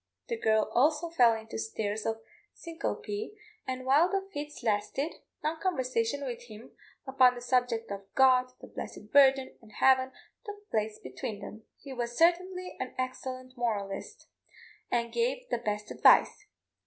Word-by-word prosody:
The 470 - 0
girl 220 - +2
also 305 +6 +2
fell 240 -8 +5
into 220 0 -7
states 220 -1 -3
of 225 0 -2 0.3
syncope, 415 +5 -5 0.3
and 255 0 -4
while 295 +7 +5
the 390 0 -1
fits 295 -3 -6
lasted, 220 +7 -1 0.3
long 315 +1 -1
conversations 260 -6 0
with 240 -2 -5
him 220 0 -12 0.3
upon 260 -2 +4
the - - -6
subject 245 -3 0
of 200 0 -7
God, 255 -1 +5
the - - -9
blessed 210 - -8
Virgin, 270 -2 +5
and 220 -2 -17
Heaven, 260 +2 +4 0.3
took 415 0 -9
place 215 0 -1
between 130 - -6
them. 220 +1 -10
He 275 - -9
was 240 -1 -4
certainly 365 +2 +2
an 255 - -5
excellent 255 0 -5
moralist, 225 - -3 0.6
and 235 -1 -1
gave - - 0
the - - 0
best 210 -1 -3
advice. 420 -1 +4
255 Hz, 150 wpm, -30 LUFS, 225-310 Hz, 0.6 s, fell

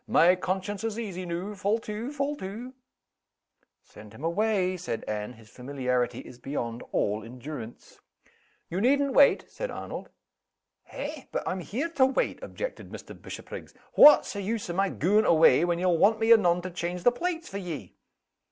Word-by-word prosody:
"My 180 +2 +5
conscience 190 +3 -3
is 225 -1 -2
easy 185 -6 -5
noo. 175 +5 -4
Fall 205 +2 0
to! 220 +5 -5
Fall 290 0 -2
to!" 225 +6 -7 1.1
"Send 105 0 -14
him 135 - -11
away!" 185 +1 +1
said 170 -10 -4
Anne. 105 +2 -4
"His 110 -2 -17
familiarity 125 0 -2
is 125 - -13
beyond 120 -3 -4
all 105 +1 0
endurance." 120 0 -9 0.7
"You 180 +3 -3
needn't 280 +3 +3
wait," 285 - +5
said - - -4
Arnold. - - -7 0.8
"Eh! 295 -1 -6
but - - -3
I'm 185 - -1
here 250 - -3
to 280 -5 +4
wait," 265 - -1
objected - - -6
Mr. - - -9
Bishopriggs. - - -9 0.2
"What's 295 0 +8
the 200 - -4
use 205 -2 -3
o' - - -4
my 195 +2 +1
gaun' 205 +7 +2
away, 160 -4 +5
when 175 -1 0
ye'll 175 -2 +2
want 220 +2 +4
me 225 +1 +6
anon 175 -5 +3
to 185 - -5
change 175 +1 -4
the 245 - +6
plates 335 +6 -3
for 200 - -5
ye?" 160 - -6
185 Hz, 170 wpm, -27 LUFS, 155-225 Hz, 1.1 s, What's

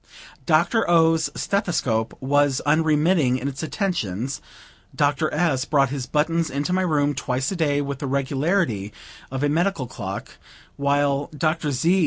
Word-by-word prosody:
Dr. 175 +6 +2
O.'s 165 -2 +4
stethoscope 135 - -1
was 145 0 +2
unremitting 155 -2 +3
in 130 - -4
its 140 0 -5
attentions; 140 - -2 0.5
Dr. 145 +1 +1
S. 150 -7 +1
brought 140 -4 +2
his 135 -3 -4
buttons 165 +2 0
into 145 +6 -2
my 185 - +2
room 145 -5 +1
twice 130 0 -2
a - - -2
day, 145 -4 +1
with 140 -1 -4
the 140 - -3
regularity 135 - 0 0.4
of 135 +1 -3
a 145 - +2
medical 165 -2 0
clock; 100 -4 -7 0.4
while 140 0 +1
Dr. 155 0 0
Z. 165 +8 +2
145 Hz, 145 wpm, -23 LUFS, 135-165 Hz, 0.5 s, O.'s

